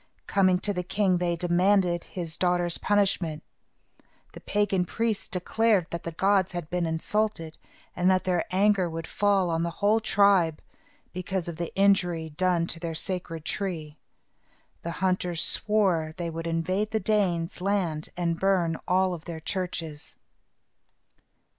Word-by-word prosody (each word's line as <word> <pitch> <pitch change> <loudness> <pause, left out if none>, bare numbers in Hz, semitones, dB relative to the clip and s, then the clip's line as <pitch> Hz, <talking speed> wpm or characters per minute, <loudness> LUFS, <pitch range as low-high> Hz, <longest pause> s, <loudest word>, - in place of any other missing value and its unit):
Coming 185 -2 +3
to 205 - -1
the 180 - -2
king, 185 0 +1
they 175 -1 0
demanded 175 +1 +2
his 170 -3 -5
daughter's 175 0 +1
punishment. 190 -6 +1 0.9
The - - -9
pagan 205 -3 +1
priests 225 +3 -2
declared 200 +1 +1
that 170 - -5
the 170 - -3
gods 190 +2 +2
had 175 -3 -5
been 175 -1 0
insulted, 165 0 -1 0.4
and 180 +1 +2
that 185 -1 +3
their 180 -2 0
anger 190 -1 +2
would 165 0 -5
fall 195 -3 +1
on 165 0 0
the 170 - 0
whole 210 +2 +3
tribe, 195 -7 +3 0.5
because 185 -1 -3
of 170 -2 -5
the 170 -1 -4
injury 180 -5 +2
done 180 +1 +1
to 170 - -4
their 165 -1 -4
sacred 165 -2 -3
tree. 165 -7 -3 0.9
The 170 - -5 0.2
hunters 180 -2 0
swore 185 -7 +2
they 170 -2 -3
would 165 +1 -5
invade 185 +5 -1
the 220 - 0
Danes' 180 -5 0
land 180 -6 -1
and 170 -2 -1
burn 180 -4 +1
all 185 0 +2
their 165 0 -7
churches. 165 -3 -4
180 Hz, 145 wpm, -27 LUFS, 165-195 Hz, 0.9 s, Coming